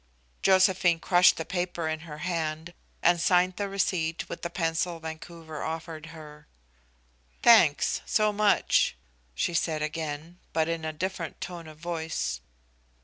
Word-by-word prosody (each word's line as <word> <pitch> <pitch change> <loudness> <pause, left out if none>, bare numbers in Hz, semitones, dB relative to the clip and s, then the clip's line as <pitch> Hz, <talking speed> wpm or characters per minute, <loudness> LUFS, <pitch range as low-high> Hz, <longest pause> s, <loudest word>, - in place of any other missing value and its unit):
Josephine 185 -3 +4
crushed 180 +2 +5
the 160 - -4
paper 175 -3 -2
in 155 0 -2
her 150 - -7
hand 165 -1 -3 0.3
and 175 0 +4
signed 180 +1 +3
the 200 -1 -2
receipt 175 -4 -1
with - - -7
the 170 - -3
pencil 165 0 -1
Vancouver 160 -1 -8
offered 160 -1 -5
her. 150 -2 -12 1.0
"Thanks, 215 -11 +5
so 215 -1 +2
much," 205 - +3 0.4
she 175 - 0
said 160 -2 0
again, 155 +2 -5
but 160 -1 +1
in 165 -1 -3
a 155 - -2
different 170 0 -4
tone 175 -2 -7
of 155 -1 -12
voice. 160 - -3
165 Hz, 140 wpm, -27 LUFS, 160-180 Hz, 1.0 s, crushed